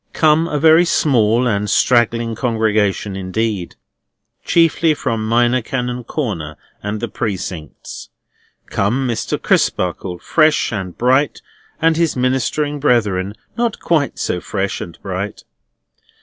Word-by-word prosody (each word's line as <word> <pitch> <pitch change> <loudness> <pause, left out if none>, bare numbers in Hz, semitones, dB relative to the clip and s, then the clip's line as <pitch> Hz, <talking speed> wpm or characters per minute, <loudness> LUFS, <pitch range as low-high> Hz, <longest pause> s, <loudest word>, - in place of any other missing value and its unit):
Come 160 +1 +3
a 150 - -2
very 160 +3 +6
small 125 -8 +2
and 105 -3 0
straggling 120 -1 +2
congregation 110 -4 0
indeed: 95 0 -3 0.7
chiefly 165 -1 +3
from 115 -6 -2
Minor 120 +2 +3
Canon 125 0 -3
Corner 85 - -4 0.2
and 105 +1 -3
the 120 - -2
Precincts. 95 -7 -6 0.6
Come 120 +7 0
Mr. 115 -2 -2
Crisparkle, 90 0 0
fresh 155 - +2
and 95 -4 -5
bright; 130 +4 +1 0.4
and 165 0 +3
his 170 -2 +1
ministering 130 +3 0
brethren, 105 -8 +1 0.2
not 235 -2 -1
quite 155 -5 0
so 90 - -2
fresh 100 -1 -3
and 85 - -8
bright. 100 +2 -4
115 Hz, 120 wpm, -18 LUFS, 100-145 Hz, 0.7 s, very